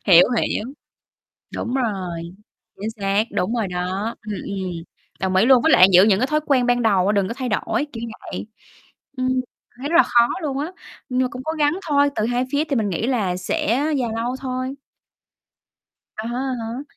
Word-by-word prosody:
Hiểu, 180 -2 +8 0.2
hiểu. 215 - -2 0.9
Đúng 245 - -3
rồi, 190 -9 -2 0.6
chính 215 +2 -2
xác, 200 -1 0
đúng 215 +6 0
rồi 225 -4 0
đó, 185 +5 -3
ừm, 210 - -3
ừm, 185 -4 -4 0.4
đồng 190 -1 0
ý 195 +5 +5
luôn, 255 -3 +6
với 320 - +4
lại 185 - +8
giữ 180 +2 +8
những 205 -2 +3
cái 255 - +2
thói 305 +1 +1
quen 255 -4 +3
ban 245 0 +2
đầu 195 -5 +3
á, 205 - +3
đừng 200 -2 +1
có - - -4
thay 255 -1 -4
đổi, 225 +4 -1
kiểu 230 - -7 0.2
vậy. - - -6 0.7
Ừm, 255 0 0 0.5
thấy 280 +3 -4
rất 335 - +2
là 345 - +9
khó 235 -1 +4 0.2
luôn 275 -3 -2
á, 305 +5 -3 0.4
nhưng 255 0 +1
mà 255 - +1
cũng 255 +1 -7
cố 315 - -1
gắng 295 +4 +2
thôi, 285 0 +4
từ 215 - +1
hai 245 +1 0
phía 290 +2 +2
thì 290 -3 -2
mình 215 -3 +1
nghĩ 190 +6 -1
là 210 -9 0
sẽ 185 - -2 0.3
dài 245 - 0
lâu 240 +3 -2
thôi. 255 0 -3 1.4
À 215 - -5
há, 240 - -4
à 260 +1 -2
há. 240 +5 -5
235 Hz, 205 wpm, -22 LUFS, 195-260 Hz, 1.4 s, là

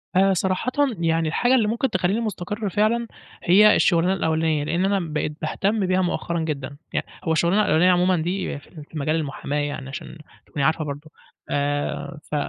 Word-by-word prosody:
آآ، 195 +1 +5
صراحةً 190 +6 0 0.3
يعني، 165 -1 +1
الحاجة 245 +11 +2
اللي 225 -5 +3
ممكن 235 +4 0
تخلّيني 185 +2 0
مستقر 210 -1 -3
فعلًا 220 +4 +1 0.4
هي 210 +4 +6
الشغلانة 175 +1 +3
الأولانية، 160 -4 0
لإن 170 +5 0
أنا 200 0 +2
بقيت 150 0 -2
باهتم 200 +6 0
بيها 185 0 +2
مؤخرًا 170 -1 -1
جدًا 140 -3 -4 0.2
يع - - +1 0.2
هو 160 - -1
الشغلانة 170 +6 +3
الأولانية 170 +3 +4
عمومًا 180 0 +3
دي 175 -3 -2
في - - -20
ال 155 -4 -11
في 155 - -10
مجال 155 +3 0
المحاماة 145 -1 -3
يعني، 145 -2 -4
عشان 145 +3 -8 0.3
تكوني 145 - -3
عارفة 160 +1 +1
برضه، 145 +2 -7 0.4
آآ، 145 0 -2
ف - - -1
170 Hz, 180 wpm, -23 LUFS, 150-195 Hz, 0.4 s, هي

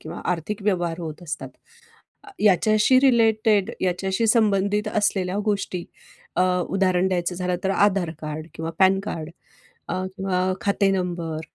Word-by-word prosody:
किंवा 155 - -8
आर्थिक 195 +5 -5
व्यवहार 175 -4 0
होत 160 0 -7
असतात. 155 -3 -5 0.9
याच्याशी 215 +5 +4
रिलेटेड 225 -5 +3
याच्याशी 190 +4 0
संबंधित 210 -2 +2
असलेल्या 200 -2 0
गोष्टी 195 -4 -2 0.5
अ, - - +2 0.3
उदाहरण 185 -1 +2
द्यायचं 180 -1 -1
झालं 180 0 -1
तर 190 - +1
आधार 195 -3 +2
कार्ड 155 0 -5
किंवा 160 0 -4
पॅनकार्ड 190 -4 +1 0.6
अ, 185 0 -2
किंवा 185 -1 0
खाते 200 -1 +2
नंबर 175 -4 -2
190 Hz, 125 wpm, -23 LUFS, 175-205 Hz, 0.9 s, याच्याशी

